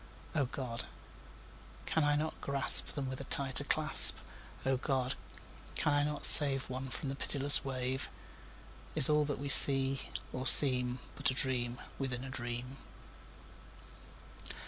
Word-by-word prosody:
O 140 - -5
God! 125 -2 -11 1.0
can 160 - -5
I 145 0 -3
not 155 +2 -9
grasp 140 -1 +4
Them 140 -3 -10
with 130 +1 -10
a - - -13
tighter 135 -1 -5
clasp? - - -1 0.5
O 135 0 -4
God! 130 -1 -7 0.6
can 150 - -4
I 145 0 -3
not 150 0 -1
save 135 -3 +3
One 130 +1 -11
from 135 - -9
the 135 - -9
pitiless 140 +1 +2
wave? 130 -1 -9 0.9
Is 130 - +4
all 150 0 -3
that 145 -1 -9
we 140 - -11
see 135 -1 +6 0.3
or 130 +1 -6
seem 125 -3 +6 0.2
But - - -5
a 130 - -8
dream 125 -2 -6 0.2
within 130 -2 -8
a 135 - -13
dream? 120 +1 -10
135 Hz, 145 wpm, -27 LUFS, 130-140 Hz, 1.0 s, see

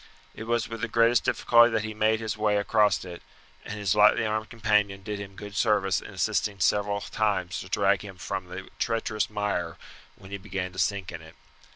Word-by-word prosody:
It 115 - -8
was 120 0 0
with 115 -1 -7
the - - -1
greatest 115 +1 +3
difficulty 120 0 +5
that 110 - 0
he 110 0 -4
made 110 +1 +1
his 110 -1 -3
way 105 -1 +1
across 105 -1 +2
it, 90 -1 -9 0.4
and 105 - -6
his 100 -1 +1
lightly 105 +2 +5
armed 110 0 -2
companion 105 -4 0
did 105 0 -4
him 100 -1 -8
good 105 +1 -9
service 105 -4 +2
in - - -10
assisting 100 -2 -1
several 100 +2 +1
times 100 -5 -1
to 95 - -9
drag 100 -1 +2
him 95 -3 -10
from 90 +1 -5
the 90 +1 -8
treacherous 110 -3 -1
mire 105 -6 -2 0.4
when 95 - -15
he 100 - -5
began 95 -1 -4
to 90 - -7
sink 100 -3 -1
in 85 -2 -8
it. 80 0 -15
105 Hz, 205 wpm, -27 LUFS, 95-110 Hz, 0.4 s, difficulty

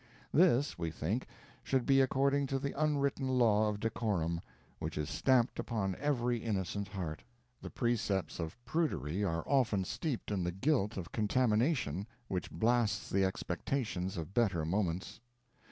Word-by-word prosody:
This, 145 - +4
we 85 -1 -1
think, 90 +10 -2 0.4
should 130 -2 +1
be 135 0 +5
according 140 +1 +2
to 135 - 0
the 140 +1 -3
unwritten 140 -2 +1
law 110 -5 +4
of 105 -1 -3
decorum, 100 -7 -1 0.4
which 80 -1 -4
is 75 0 -2
stamped 130 -2 +2
upon 100 -5 -1
every 125 -4 +1
innocent 100 -2 -2
heart. 90 -6 -5 0.4
The - - -6
precepts 110 -8 -1
of 80 +3 -4
prudery 105 - 0
are 85 -4 0
often 125 -8 +2
steeped 125 - -3
in 95 -3 0
the 90 - 0
guilt 105 - +1
of 90 -3 -5
contamination, 110 - +1 0.2
which 90 -2 -2
blasts 120 -1 +1
the 95 0 +3
expectations 95 0 -2
of 85 +3 -5
better 95 -9 +2
moments. 90 +2 -1
105 Hz, 145 wpm, -33 LUFS, 95-130 Hz, 0.4 s, be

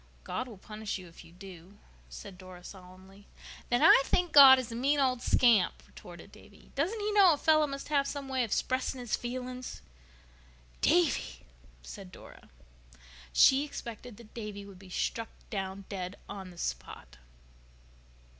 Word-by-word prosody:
"God 255 - -4
will 225 -5 -11
punish 215 +2 -6
you 185 -2 -11
if 165 - -15
you - - -17
do," 185 +1 -13 0.3
said 200 -2 -10
Dora 185 -1 -12
solemnly. 190 +2 -14 0.4
"Then 245 0 +2
I - - +8
think 355 +4 0
God 270 -2 +10
is 255 -3 -4
a - - -6
mean 280 +5 +1
old 255 -3 +1
scamp," 235 -8 +3
retorted - - -13
Davy. - - -18
"Doesn't 350 +11 -1
He 420 0 -2
know 395 -5 +6
a - - -2
fellow 310 0 +3
must 275 0 -7
have 280 -2 +1
some 280 -1 -5
way 260 -1 0
of 225 - -5
'spressing 255 0 -1
his 245 -2 -2
feelings?" 250 +1 -6 1.0
"Davy!!!" 350 0 +1 0.4
said 195 -3 -10
Dora. - - -15 0.8
She 265 - +5
expected 240 -5 -8
that 230 -2 -16
Davy 210 -3 -7
would 195 -2 -13
be 190 -1 -14
struck 225 +5 -3 0.2
down 195 -1 -5
dead 185 -1 -6
on 190 -2 -8
the 175 - -15
spot. - - -6
230 Hz, 160 wpm, -30 LUFS, 190-270 Hz, 1.0 s, God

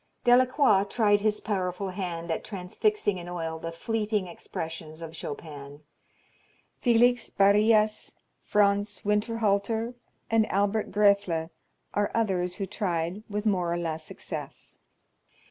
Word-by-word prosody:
Delacroix 250 -4 +5
tried 205 -1 +2
his 210 0 +1
powerful 190 -2 -2
hand 175 -3 -4
at - - -2
transfixing 200 - -1
in 175 0 -8
oil 165 -2 -4
the 165 +1 -5
fleeting 210 +3 -1
expressions 160 -2 -7
of 165 0 -8
Chopin. 145 -2 -8 1.0
Felix 245 0 +3
Barrias, 210 +2 +3 0.3
Franz 205 0 +1
Winterhalter, 220 +1 +1 0.4
and 225 -1 +3
Albert 205 +2 +1
Graefle 200 -5 +2 0.4
are 205 0 +1
others 185 -5 0
who 195 - -3
tried 180 -1 -2
with 210 +1 -3
more 180 -5 +1
or 170 - 0
less 160 -2 -3
success. - - -8
200 Hz, 115 wpm, -27 LUFS, 175-215 Hz, 1.0 s, Delacroix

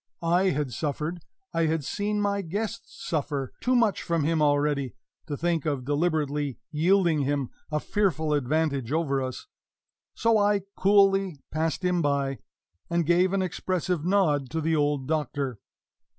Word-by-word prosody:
I 175 +3 +3
had 145 -7 0
suffered, 155 +6 -3 0.3
I 165 -1 +2
had 160 -1 0
seen 210 +5 -1
my 200 0 0
guests 200 +5 -5
suffer, 140 -4 -2
too 255 0 +2
much 225 -5 +3
from 170 -3 0
him 160 +1 +1
already 145 -2 +1 0.3
to 145 -3 -3
think 170 -2 0
of 140 -4 -1
deliberately 145 -2 0
yielding 170 +1 +3
him 140 -2 -1 0.2
a 150 - +1
fearful 170 -6 0
advantage 140 -2 0
over 150 -4 +1
us; 130 -1 -5 0.7
so 230 -1 +3
I 205 -1 +2
coolly 195 -4 +3
passed 160 +3 -1
him 180 -1 +2
by, 140 -2 0 0.5
and 170 -1 +1
gave 180 +3 +3
an 195 -1 +1
expressive 180 -2 -2
nod 160 -8 +2
to 160 - -2
the 160 +1 +1
old 145 -3 0
Doctor. 145 -6 -2
160 Hz, 150 wpm, -27 LUFS, 145-185 Hz, 0.7 s, I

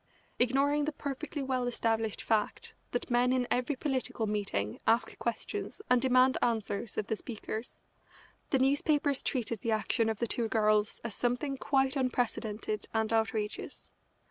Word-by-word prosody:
Ignoring 280 +4 +3
the 310 - 0
perfectly 290 0 -4
well 255 -2 0
established 225 -2 0
fact 215 -2 0 0.2
that 245 - -3
men 245 +1 +4
in 255 -1 +2
every 250 +4 +1
political 260 -4 -1
meeting 200 - -2
ask 230 +2 +3
questions 235 - -3
and 250 -1 +5
demand 255 0 +4
answers 220 -2 -1
of - - 0
the 220 - -1
speakers, 220 0 -6 0.7
the 270 - +3
newspapers 285 +1 +2
treated 235 -4 -1
the 230 +2 0
action 220 +1 +1
of 220 - -1
the 235 - 0
two 235 0 +1
girls 215 -1 +2
as 235 -3 -3
something 250 +3 0
quite 270 0 +1
unprecedented 230 -5 -1
and 220 0 +1
outrageous. 220 -1 -2
240 Hz, 145 wpm, -31 LUFS, 220-265 Hz, 0.7 s, and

